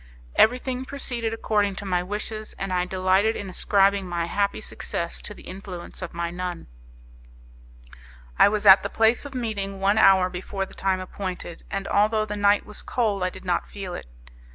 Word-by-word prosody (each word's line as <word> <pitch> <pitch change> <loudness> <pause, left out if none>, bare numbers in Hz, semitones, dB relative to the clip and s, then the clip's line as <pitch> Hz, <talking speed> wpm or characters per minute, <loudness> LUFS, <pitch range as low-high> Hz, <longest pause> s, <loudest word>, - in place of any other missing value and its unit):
Everything 250 +2 +3
proceeded 245 -4 -2
according 210 -3 0
to 200 - -6
my 180 -2 +1
wishes, 215 +3 -4
and 195 -1 -4
I 180 0 +1
delighted 190 +4 +2
in 195 -2 -5
ascribing 195 +1 +2
my 170 -1 -1
happy 200 +3 0
success 170 -5 -4
to 210 - -6
the - - -14
influence 185 -2 -8
of 180 -2 -6
my 170 0 -2
nun. 180 -1 -5 1.7
I - - +8
was 210 0 -1
at 195 0 +9
the - - -3
place 225 +4 +2
of 280 -2 -8
meeting 200 -5 -3
one 200 +3 +3
hour 190 -3 +6
before 190 +2 -4
the - - -15
time 190 -1 0
appointed, 185 -2 -6
and 195 0 -3
although 215 +1 +2
the 210 -1 -4
night 205 0 +3
was 210 - -8
cold 215 -5 -1
I 185 - +1
did - - -12
not 180 -1 0
feel 195 -3 -6
it. - - -7
195 Hz, 180 wpm, -25 LUFS, 185-215 Hz, 1.7 s, at